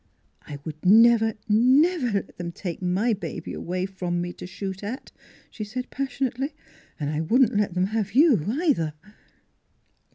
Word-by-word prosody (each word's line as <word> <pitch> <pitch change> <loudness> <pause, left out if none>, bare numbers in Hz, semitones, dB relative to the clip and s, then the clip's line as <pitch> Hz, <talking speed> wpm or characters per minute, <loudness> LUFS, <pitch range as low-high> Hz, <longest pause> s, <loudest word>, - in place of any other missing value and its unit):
" - - -31
I 145 - -5
would 155 -1 -7
never, 225 +2 +6
never 255 +6 +4
let 200 -2 -3
them 170 -1 -4
take 175 0 -6
my 190 +6 +1
baby 205 - -6
away 180 +1 -3
from 180 -2 -3
me 175 0 -3
to - - -9
shoot 190 0 -6
at," 240 +7 -6 0.4
she 215 - -6
said 250 +5 -6
passionately. 270 +1 -2 0.2
" - - -30
And 145 -1 -2
I 155 +1 -1
wouldn't 235 +7 +3
let 205 -3 0
them 180 +1 +2
have 210 -3 -1
you, 270 - +5
either 250 - +1
210 Hz, 165 wpm, -25 LUFS, 180-250 Hz, 0.4 s, never